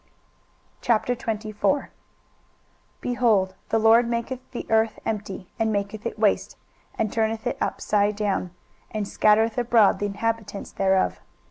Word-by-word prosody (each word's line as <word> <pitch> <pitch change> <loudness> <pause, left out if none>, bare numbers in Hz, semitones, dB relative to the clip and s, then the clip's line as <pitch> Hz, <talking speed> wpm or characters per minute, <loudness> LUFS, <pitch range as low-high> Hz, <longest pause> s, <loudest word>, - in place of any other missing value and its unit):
23:024:001 225 +2 0 1.1
Behold, 220 -6 +2 0.2
the 225 - +2
LORD 225 +2 +5
maketh 235 +2 -2
the 240 - -6
earth 220 0 +2
empty, 200 -3 -4
and 220 -1 +1
maketh 205 +2 -2
it 230 - -6
waste, 210 -2 +1 0.4
and 220 -2 -1
turneth 225 +1 -1
it 245 - -1
upside 205 0 +1
down, 200 -3 -1 0.4
and 210 -2 -3
scattereth 220 +3 +3
abroad 235 -4 +4
the 205 - 0
inhabitants 205 0 -3
thereof. 190 -1 +1
220 Hz, 120 wpm, -24 LUFS, 205-230 Hz, 1.1 s, LORD